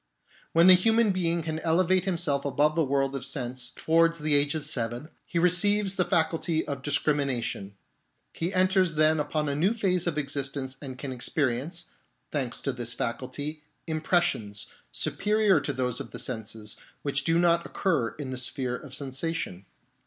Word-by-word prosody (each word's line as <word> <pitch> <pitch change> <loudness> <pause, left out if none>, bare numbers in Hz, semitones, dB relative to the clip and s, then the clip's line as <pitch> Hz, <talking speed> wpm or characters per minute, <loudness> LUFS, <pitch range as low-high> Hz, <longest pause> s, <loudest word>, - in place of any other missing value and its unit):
When 165 +1 +6
the 185 - +10
human 225 +3 +4
being 170 -2 0
can 160 0 -3
elevate 180 +3 +2
himself 165 -7 0
above 145 +2 +2
the 165 - +3
world 135 0 0
of 135 - -4
sense, 125 -2 -3
towards 165 +1 +3
the 150 -1 +1
age 145 +1 +3
of 155 - -3
seven, 120 +4 -2 0.2
he 170 - -3
receives 195 +3 +4
the 180 -2 +1
faculty 160 0 +1
of 140 -2 -4
discrimination; 135 -8 0 0.6
he 170 +3 -2
enters 185 -2 +3
then 155 +1 +4
upon 150 0 -1
a 140 - 0
new 185 +10 +2
phase 180 -5 +1
of 160 -3 -1
existence 135 -2 -3
and 130 -3 -7
can 135 +1 -5
experience, 140 +6 -1 0.5
thanks 130 -5 -2
to 135 - -1
this 120 -2 -3
faculty, 140 +6 -4 0.2
impressions, 155 - 0 0.3
superior 210 -5 +2
to 140 - -2
those 125 -1 -2
of - - -7
the - - -8
senses, 110 -3 -4 0.3
which 140 -1 0
do 165 +2 +2
not 170 -1 +3
occur 160 - -1
in 140 -3 -6
the 130 - -4
sphere 125 0 -2
of 135 0 -8
sensation. 135 - -4
150 Hz, 165 wpm, -27 LUFS, 130-170 Hz, 0.6 s, the